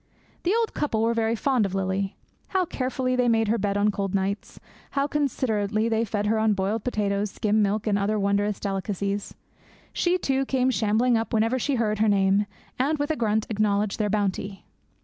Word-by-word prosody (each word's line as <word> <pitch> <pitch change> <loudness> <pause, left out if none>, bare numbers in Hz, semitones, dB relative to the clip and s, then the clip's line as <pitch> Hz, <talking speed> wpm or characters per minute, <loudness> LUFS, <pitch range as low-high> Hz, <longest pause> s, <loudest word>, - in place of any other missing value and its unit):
The 370 +5 +1
old 455 -2 -1
couple 225 -7 0
were 230 +1 +2
very 225 0 +1
fond 255 0 +1
of 195 -1 -2
Lily. 190 0 -1 0.3
How 375 -1 +1
carefully 255 -3 -1
they 250 -1 +2
made 225 -2 +2
her 230 - +2
bed 200 0 0
on 205 +1 +3
cold 200 -1 -2
nights! 195 +1 -2 0.4
How 275 - +3
considerately 225 -7 0
they 225 0 +1
fed 205 -1 -2
her 220 +1 +2
on 220 -1 +3
boiled 200 +3 -1
potatoes, 205 -3 -1
skim 215 +2 +1
milk, 210 +1 0
and 205 -2 +1
other 210 +2 0
wondrous 200 0 0
delicacies! 200 0 -3 0.6
She, 355 +1 +2
too, 270 -6 0
came 260 -1 +1
shambling 230 +1 +2
up 225 - -4
whenever 225 +4 +2
she 280 +3 0
heard 215 -3 0
her 220 0 +3
name, 200 +1 +3 0.3
and, 290 +4 +1
with 290 +2 -1
a - - 0
grunt, 220 -3 0
acknowledged 210 -1 0
their 210 -1 +1
bounty. 200 -1 -2
215 Hz, 190 wpm, -25 LUFS, 200-245 Hz, 0.6 s, on